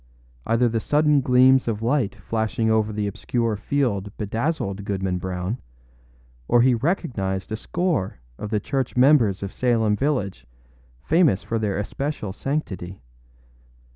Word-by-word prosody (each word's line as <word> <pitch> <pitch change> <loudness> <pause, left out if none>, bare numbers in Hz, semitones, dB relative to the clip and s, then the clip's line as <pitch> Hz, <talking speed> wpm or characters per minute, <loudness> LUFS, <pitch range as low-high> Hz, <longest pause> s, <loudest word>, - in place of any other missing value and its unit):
Either 115 +2 +3
the 115 0 0
sudden 150 +3 +3
gleams 130 0 +5
of 110 -1 -2
light 120 -4 +1
flashing 110 0 -1
over 110 -1 +2
the 105 0 -2
obscure 110 +2 -1
field 105 -3 -1
bedazzled 105 - -2
Goodman 95 -2 -2
Brown, 95 +5 -3 0.9
or 120 - +4
he 130 0 +5
recognized 110 - -2
a - - 0
score 160 - -1 0.2
of 105 - -5
the 105 -1 +1
church 130 +4 -2
members 125 -8 +4
of 100 - -5
Salem 115 -4 +2
village 100 - -2 0.6
famous 155 - +3
for 115 - -2
their 105 -3 -1
especial 110 -1 -3
sanctity. 95 - -4
110 Hz, 135 wpm, -23 LUFS, 100-130 Hz, 0.9 s, gleams